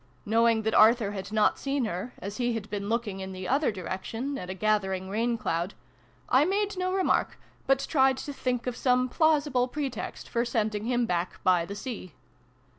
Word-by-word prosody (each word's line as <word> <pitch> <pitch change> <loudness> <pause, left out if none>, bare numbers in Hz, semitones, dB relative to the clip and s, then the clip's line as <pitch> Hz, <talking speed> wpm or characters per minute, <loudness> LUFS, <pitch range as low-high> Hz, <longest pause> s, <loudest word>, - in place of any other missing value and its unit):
Knowing 225 +1 +3
that 220 0 0
Arthur 220 -1 +5
had 195 0 -6
not 215 -1 +2
seen 275 -2 -1
her, 185 +4 -4
as 200 +1 -6
he 245 -1 0
had 220 -2 -4
been 205 -1 -3
looking, 220 -4 -1
in 190 0 -6
the 185 0 -6
other 275 +1 +2
direction, 210 +8 -4
at 180 -9 -6
a 185 - -4
gathering 190 -2 0
rain 230 +3 0
cloud, 170 -2 -2 0.5
I 260 +3 +5
made 405 +4 0
no 365 0 -1
remark, 380 0 +1 0.3
but 270 0 +3
tried 265 -3 +3
to 285 - -5
think 250 -3 -2
of 250 -1 -2
some 255 0 +2
plausible 290 -5 +2
pretext 275 -1 -5
for 235 - 0
sending 215 -3 -1
him 245 0 +1
back 175 -3 -2
by 180 -2 +3
the 200 - -6
sea. 205 - -7
230 Hz, 190 wpm, -28 LUFS, 200-260 Hz, 0.5 s, Arthur